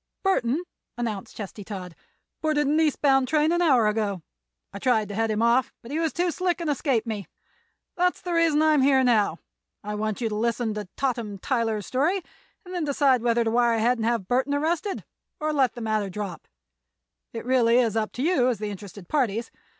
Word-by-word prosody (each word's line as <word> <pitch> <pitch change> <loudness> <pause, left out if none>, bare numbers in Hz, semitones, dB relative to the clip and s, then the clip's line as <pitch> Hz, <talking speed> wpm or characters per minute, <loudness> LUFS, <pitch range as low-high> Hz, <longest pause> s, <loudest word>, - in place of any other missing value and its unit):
"Burthon," 290 -6 +2 0.4
announced 220 -5 -4
Chesty 205 0 -7
Todd, 185 -4 -7 0.5
"boarded 305 -2 +1
an 300 +3 +2
east 310 -3 +1
bound 270 -2 +4
train 305 +2 +2
an 345 +1 +2
hour 265 -9 +4
ago. 210 -4 -1 0.5
I 200 - -6
tried 220 -3 +1
to - - -5
head 225 +2 0
him 215 +1 0
off, 250 +3 +3
but 235 - -10
he 310 - -1
was 325 -2 0
too 350 0 0
slick 360 +1 -1
and 330 -3 -1
escaped 265 -4 0
me. 215 -4 -4 0.7
That 360 0 +2
is - - -18
the 355 - -3
reason 325 -2 +3
I 310 0 +4
am 295 - +4
now 250 - +3
here. - - -27 0.4
I 210 +1 -4
want 215 0 -2
you 235 - 0
to - - -4
listen 230 0 0
to 210 -2 -5
Totham 235 -7 -2
Tyler's 225 -2 -1
story 330 +9 0 0.4
and 365 - -9
then 350 -2 -1
decide 275 -4 +3
whether 235 0 +2
to 225 - 0
wire 235 0 +3
ahead 235 +2 +2
and 220 - -1
have 230 -5 0
Burthon 260 +5 +1
arrested 330 +6 -1 0.4
or 305 0 -1
let 270 -4 +2
the 240 - -7
matter 215 -2 -1
drop. 190 -3 -6 0.8
It 230 - -5
is - - -15
really 245 -2 +4
up 225 -3 0
to 250 - -3
you, 305 -7 +3
as 250 -3 +1
the 210 +1 -4
interested 200 -2 -10
parties. 230 - 0
240 Hz, 210 wpm, -25 LUFS, 215-295 Hz, 0.8 s, bound